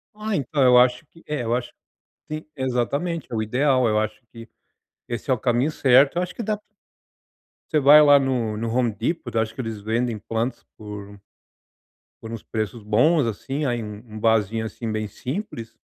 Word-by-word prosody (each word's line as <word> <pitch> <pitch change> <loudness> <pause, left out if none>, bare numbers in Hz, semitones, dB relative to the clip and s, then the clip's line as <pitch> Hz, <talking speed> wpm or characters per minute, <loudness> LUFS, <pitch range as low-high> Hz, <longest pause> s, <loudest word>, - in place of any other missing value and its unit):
Ah, 215 0 -3
então 140 -2 0
eu 125 -1 +7
acho 125 +3 +4
que, 165 +2 -20
eh, 150 -4 -2
eu 115 +1 0
acho 120 -1 -4 0.6
que, 155 - -3
sim, - - -24
exatamente, 140 +6 -1
é - - -3
o 110 - 0
ideal, 130 +3 +2
eu 105 -1 +2
acho 110 0 -3
que 115 0 -11 0.6
esse 120 +3 -5
é - - +5
o - - 0
caminho 125 +5 +1
certo, 135 +2 +4
eu - - +2
acho 180 0 -4
que 235 - -4
dá 215 0 0
pra - - -27 1.1
Você 155 -2 +2
vai 145 +2 +9
lá 145 -1 +7
no 125 -5 0
no 115 +1 -3
Home 120 -2 +1
Deport, 120 - -3
acho 110 0 0
que 115 - -16
eles 115 -4 -4
vendem 115 +2 -1
plantas 115 +4 -3
por 100 -1 -9 1.0
por 110 - -7
uns 115 -2 -6
preços 110 +1 -4
bons, 125 +9 +3
assim, 135 +7 -3
aí 120 -3 -1
um 105 -1 -7 0.2
um - - -6
vasinho, 110 0 +1
assim, 110 0 -5
bem 110 0 -2
simples 115 - -6
120 Hz, 195 wpm, -23 LUFS, 110-140 Hz, 1.1 s, vai